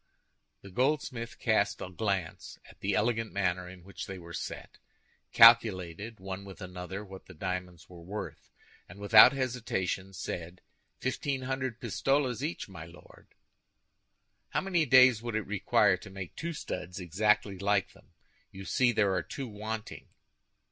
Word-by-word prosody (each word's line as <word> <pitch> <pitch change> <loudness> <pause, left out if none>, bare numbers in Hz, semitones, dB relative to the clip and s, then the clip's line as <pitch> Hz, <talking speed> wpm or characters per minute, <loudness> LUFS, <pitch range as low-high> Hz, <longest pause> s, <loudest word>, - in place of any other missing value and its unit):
The 100 - -11
goldsmith 125 0 -1
cast 105 -3 +1
a 95 - -6
glance 95 -4 -3
at - - -17
the 100 0 -1
elegant 115 +2 0
manner 90 -2 -1
in 90 -1 -13
which 100 +2 -8
they 95 - -6
were 85 -1 -11
set, - - -7 0.5
calculated, 110 -3 +5
one 95 +1 -6
with 100 -1 -11
another, 90 +2 -7
what 95 -1 -12
the - - -12
diamonds 90 0 -5
were 90 -2 -13
worth, 100 +5 -7 0.4
and 90 - -12
without 110 +4 +8
hesitation 115 -8 -2
said, 90 -1 -6 0.4
"Fifteen 130 +1 -2
hundred 130 -2 -3
pistoles 135 -4 0
each, 155 +4 -3
my 85 -5 -10
Lord." 85 +1 -17 1.1
"How - - 0
many 175 -5 +1
days 125 -3 +7
would 120 -2 -4
it 110 - -1
require 100 -2 +2
to 95 - -12
make 95 -2 -8
two 170 +1 -4
studs 90 - -6
exactly 100 +2 +1
like 100 0 +1
them? - - -21 0.4
You 95 0 -9
see 125 +3 +3
there 105 -4 +2
are - - 0
two 135 -2 -6
wanting." 110 0 -6
100 Hz, 150 wpm, -30 LUFS, 95-120 Hz, 1.1 s, without